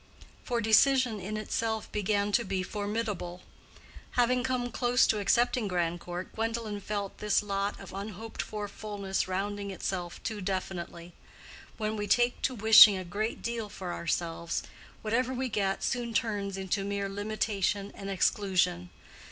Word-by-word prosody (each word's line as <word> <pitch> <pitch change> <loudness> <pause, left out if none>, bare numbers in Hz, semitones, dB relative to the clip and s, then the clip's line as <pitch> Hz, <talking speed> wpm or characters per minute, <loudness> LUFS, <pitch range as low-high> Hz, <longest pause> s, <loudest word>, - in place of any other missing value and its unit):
For 240 -2 -1
decision 230 +1 +4
in 205 +3 -4
itself 220 +1 -2
began 205 0 0
to 235 +3 +3
be 190 -2 -2
formidable. 205 -3 -3 0.7
Having 250 0 +3
come 250 -1 -1
close 245 +1 +3
to 215 - +1
accepting 235 +2 +2
Grandcourt, 175 0 -2
Gwendolen 225 -2 -2
felt 200 -1 -4
this 210 0 +2
lot 200 0 -2
of - - -10
unhoped 210 +3 -5
for 210 -1 -4
fullness 200 -3 -3
rounding 200 +2 -2
itself 180 -2 -4
too 215 -2 -3
definitely. 180 -2 -4 0.6
When 215 0 -1
we 205 -1 -3
take 240 +2 +3
to 260 - 0
wishing 215 -2 +9
a 185 - -4
great 215 +6 -3
deal 230 -2 -3
for 180 -3 -5
ourselves, 170 0 -2 0.4
whatever 245 +4 0
we 260 0 -1
get 195 -3 0
soon 240 -3 -1
turns 205 -3 -1
into 195 +1 -1
mere 200 0 -2
limitation 205 -1 -1
and 195 - -7
exclusion. 180 -2 +1
205 Hz, 145 wpm, -30 LUFS, 190-225 Hz, 0.7 s, wishing